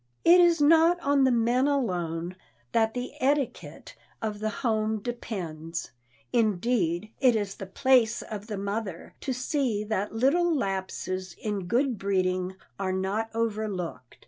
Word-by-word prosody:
It 345 +2 +8
is 340 -2 +5
not 325 +4 +5
on 280 -2 +3
the 260 - +4
men 240 +3 +2
alone 180 - -1 0.4
that 225 0 +2
the 245 0 -3
etiquette 275 0 -1 0.2
of 215 -2 -3
the 215 0 -1
home 220 -1 0
depends. 175 -8 -5 0.4
Indeed, 215 -3 +1
it 255 -3 +5
is 205 -2 -1
the 195 - -8
place 240 +2 +3
of 210 -1 -7
the 210 -3 -4
mother 200 -3 -4
to 270 - -2
see 255 -4 -1
that 210 -1 -2
little 310 +9 +2
lapses 190 -3 -3
in 205 -4 -3
good 245 +1 +1
breeding 185 -1 0 0.2
are 190 -1 -1
not 195 +4 -1
overlooked. 205 - -3
215 Hz, 140 wpm, -27 LUFS, 190-255 Hz, 0.4 s, It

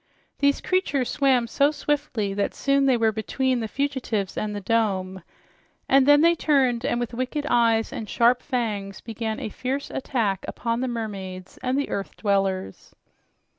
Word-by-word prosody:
These 280 0 +2
creatures 290 -9 0
swam 265 -4 +3
so 280 +5 +2
swiftly 290 -9 -2
that 200 0 -1
soon 275 0 +2
they 255 -2 +4
were 225 -1 +3
between 255 +4 -1
the 225 - -2
fugitives 245 -6 -2
and 210 -1 -3
the - - -3
dome, 190 -3 0 0.7
and 270 0 +5
then 290 0 +7
they 335 +1 +6
turned 265 -7 +2
and 240 - 0
with 240 -1 -3
wicked 255 +5 -2
eyes 230 -3 +2
and 215 -3 -6
sharp 240 +1 +3
fangs 210 -7 -3
began 220 -1 -4
a - - -4
fierce 265 +5 -4
attack 210 -8 -1
upon 230 0 -2
the 260 - -1
mermaids 195 -6 -6
and 255 +1 0
the 285 - -1
earth 195 - -4
dwellers. 195 - -1
235 Hz, 165 wpm, -24 LUFS, 210-270 Hz, 0.7 s, then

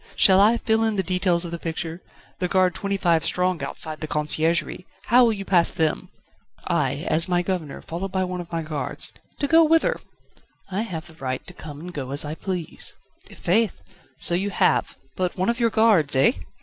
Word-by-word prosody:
Shall 190 -2 +6
I 220 +3 +5
fill 225 -1 +1
in 220 -1 +1
the 190 - 0
details 180 -2 +1
of 170 - -6
the 170 - -5
picture? 165 +1 -5 0.4
the 180 - 0
guard 185 -1 +2
twenty 200 0 -2
five 170 -4 +2
strong 180 -3 0
outside 155 +2 -1
the 155 - -3
Conciergerie, 155 +3 -1 0.2
how 245 +3 +5
will 230 -2 +3
you 195 -2 -6
pass 175 -3 +3
them?" 160 -2 -1 0.6
"I - - -1
as 165 +3 +4
the 175 -1 +1
Governor, 175 -6 -4
followed 180 +4 -5
by 190 -1 0
one 180 -1 -4
of 175 - -12
my 165 -1 -2
guards 150 -4 -3
..." - - -35
"To - - +2
go 330 +2 +6
whither?" 325 +10 +2 0.7
"I 195 +3 -1
have 175 -8 -5
the 160 - -15
right 130 -4 -5
to 180 - -12
come 150 -4 -10
and 180 +1 -8
go 135 -4 -5
as 140 +2 -2
I 150 - -4
please." 180 0 -3 0.3
"I' - - -13
faith! 210 +3 +1 0.4
so - - +2
you 190 +4 0
have, 190 - +1 0.2
but 180 0 -2
'one 185 +4 +1
of 235 +1 -1
your 235 -1 +3
guards' 210 -11 +3
eh? 135 - +5
180 Hz, 210 wpm, -23 LUFS, 160-195 Hz, 0.7 s, Shall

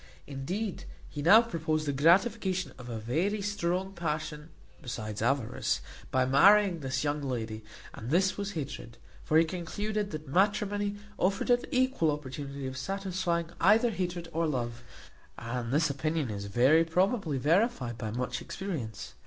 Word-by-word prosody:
Indeed, 180 +10 -4 0.2
he 145 - -6
now 210 +9 +8
proposed 160 -7 -1
the 145 - 0
gratification 185 - +2
of 125 0 -9
a 115 - -4
very 165 - 0
strong 190 -1 -1
passion 155 -2 -4 0.3
besides 110 -6 -5
avarice, 125 0 0 0.3
by 130 -1 +2
marrying 190 +7 +5
this 135 -1 -2
young 145 0 -1
lady, 115 -5 -4 0.3
and 115 - -7
this 185 +5 +3
was 200 0 -4
hatred; 135 -6 -6 0.3
for 155 - +3
he 165 - +6
concluded 205 +5 -3
that 155 -3 -7
matrimony 205 +4 +1 0.2
afforded 240 +6 +2
an - - -18
equal 255 -10 +2
opportunity 140 -1 -4
of 130 0 -5
satisfying 180 0 -2
either 220 +6 +5
hatred 175 -3 -3
or 165 +1 +1
love; 120 -5 -3 0.6
and 120 +1 -4
this 150 +2 +2
opinion 150 -2 -1
is 100 -1 -5
very 130 +11 +4
probably 180 - +1
verified 145 - +1
by 110 - -3
much 125 +3 -3
experience. 135 - -5
160 Hz, 145 wpm, -30 LUFS, 130-190 Hz, 0.6 s, now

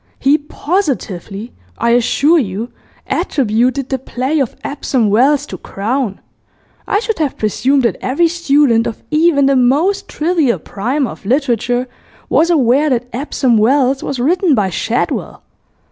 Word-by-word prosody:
He 285 +3 +3
positively, 250 - -3 0.2
I 235 +1 +1
assure 280 +7 +3
you, 220 0 -4 0.3
attributed 255 +1 0
the 265 - -1
play 265 +4 -2
of 265 -5 -1
"Epsom 255 -6 -1
Wells" 265 +7 +3
to - - -8
Crowne! 220 +1 -3 0.7
I 405 - +2
should 445 -5 -3
have 300 -4 -1
presumed 260 +6 +1
that 235 - 0
every 290 +7 +2
student 285 -8 +2
of 225 - -7
even 305 -2 +3
the 275 0 +3
most 320 +11 +2
trivial 310 -6 0
primer 250 +7 -2
of - - -12
literature 245 +1 0 0.4
was 335 - +3
aware 290 -1 +3
that 250 -1 -1
"Epsom 255 -3 +1
Wells" 265 +3 +2
was 275 - -4
written 330 +4 +2
by 200 -4 0
Shadwell.... 230 +8 -2
265 Hz, 140 wpm, -15 LUFS, 235-300 Hz, 0.7 s, He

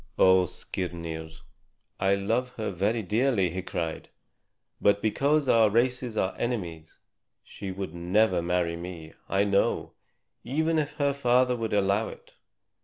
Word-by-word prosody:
"Oh, 95 -1 +6
Skirnir, 85 -3 -5 0.7
I 95 0 +3
love 115 +6 -1
her 110 - -3
very 105 +5 0
dearly," 105 -2 +1
he 95 +2 -3
cried; 85 -3 -4 0.7
"but 100 0 +4
because 140 +7 +1
our 115 -3 +5
races 120 +1 0
are 95 - +1
enemies 85 -10 -4 0.5
she 100 - -8
would 95 -3 -5
never 90 +2 +2
marry 85 -1 0
me, 85 -2 -8 0.2
I 100 +1 +2
know, 100 -1 +1 0.5
even 160 +4 +1
if 150 -1 -2
her 140 -2 +1
father 125 -2 +3
would 115 -2 -3
allow 100 +2 +2
it. - - -12
100 Hz, 135 wpm, -27 LUFS, 90-120 Hz, 0.7 s, Oh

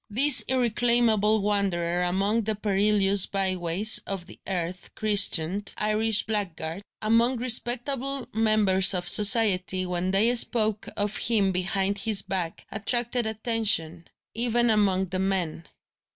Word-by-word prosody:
This 265 +5 +5
irreclaimable 235 -4 +1
wanderer 180 -4 -1
among 195 +5 -1
the 220 0 -2
perilous 200 -1 +1
by 195 -1 -1
ways 180 +5 +1
of 195 -3 -5
the - - -15
earth 180 -1 -4
christened 200 -2 +1
"Irish 215 0 +1
blackguard," 190 -5 -4 0.2
among 230 +4 +1
respectable 255 +2 -2
members 210 -4 +3
of 175 -1 -3
society, 195 -2 +3
when 180 0 -3
they 210 +5 +2
spoke 220 -3 +1
of 205 0 -2
him 205 -4 +1
behind 190 +2 -2
his 205 -2 0
back 180 -4 -4
attracted 240 +2 -2
attention, 215 -7 -2 0.3
even 240 0 0
among 190 -3 0
the 185 +1 -4
men. 185 -4 -3
205 Hz, 125 wpm, -25 LUFS, 185-225 Hz, 0.3 s, This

